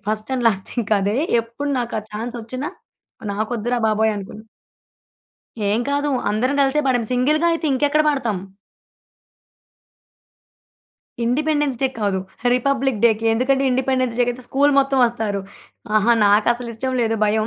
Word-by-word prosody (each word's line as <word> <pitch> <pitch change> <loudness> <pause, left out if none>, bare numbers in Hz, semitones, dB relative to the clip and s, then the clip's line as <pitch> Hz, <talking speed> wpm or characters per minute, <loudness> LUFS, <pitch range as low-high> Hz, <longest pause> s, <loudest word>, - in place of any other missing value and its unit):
First 215 +2 -2
and 245 -2 0
last 195 -3 -3
ఇంకా 215 -1 0
అదే. 205 +3 0 0.3
ఎప్పుడు 235 +6 -6
నాకు 240 -1 -3
ఆ - - -14
ఛాన్స్ 230 +3 -5
వచ్చినా, 255 +6 -5 0.6
నాకు 215 +3 -3
వద్దురా 240 +3 -1
బాబోయ్! 220 0 +2
అనుకున్నా. 205 +2 -8 1.3
ఏం 215 +3 +1
కాదు. 285 +1 0 0.2
అందరం 245 +6 0
కలిసే 275 +2 +2
పాడాం. 245 -3 +1
సింగిల్‌గా 300 +7 +2
అయితే 330 -1 -2
ఇంకెక్కడ 290 +3 +2
పాడతాం. 240 -9 -1 2.9
ఇండిపెండెన్స్ 295 +1 0
డే 265 - +4
కాదు. 200 -2 0 0.4
రిపబ్లిక్ 265 -2 0
డేకి. 225 -1 +3
ఎందుకంటే, 265 +3 +1
ఇండిపెండెన్స్ 255 -2 0
డేకి 245 0 +3
అయితే 250 +1 -11
స్కూలు 285 +2 +3
మొత్తం 270 0 0
వస్తారు. 220 -4 -2 0.6
ఆహా! 215 +3 +4
నాకు 205 +2 +4
అసలు 240 0 -7
ఇష్టం 260 +3 -3
లేదు 225 0 0
భయం. 215 +1 +1
240 Hz, 140 wpm, -21 LUFS, 220-270 Hz, 2.9 s, డే